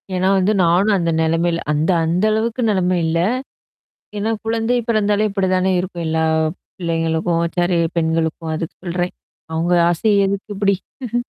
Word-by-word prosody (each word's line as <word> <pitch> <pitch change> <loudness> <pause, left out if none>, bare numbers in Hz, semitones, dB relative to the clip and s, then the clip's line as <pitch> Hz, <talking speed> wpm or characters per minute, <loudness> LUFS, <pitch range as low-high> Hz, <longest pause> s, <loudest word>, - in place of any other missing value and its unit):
ஏன்னா 185 +1 +1
வந்து 195 +3 +2
நானும் 185 +5 +3
அந்த 170 -2 0
நெலமைல 165 +1 +1
அந்த 155 +5 +1
அந்த 175 +5 0
அளவுக்கு 230 +3 -1
நெலம 185 -3 +1
இல்ல. 160 +1 0 1.0
ஏன்னா 215 +2 -1
குழந்தை 225 +2 0
பிறாந்தாலே 210 -1 +2
இப்டி 195 -1 -1
தானே 185 +1 +1
இருக்கும். 175 -2 -4
எல்லா 160 0 0 0.5
பிள்ளைங்களுக்கும், 165 -1 0 0.2
சாரி 175 0 +2 0.2
பெண்களுக்கும் 160 0 -1
அதுக்கு 165 +1 -5
சொல்றேன். 175 +1 -2 0.4
அவங்க 165 +2 0 0.2
ஆசை 205 +5 +1
எதுக்கு 200 +1 -4
இப்டி? 205 +5 -2
180 Hz, 140 wpm, -19 LUFS, 165-205 Hz, 1.0 s, நானும்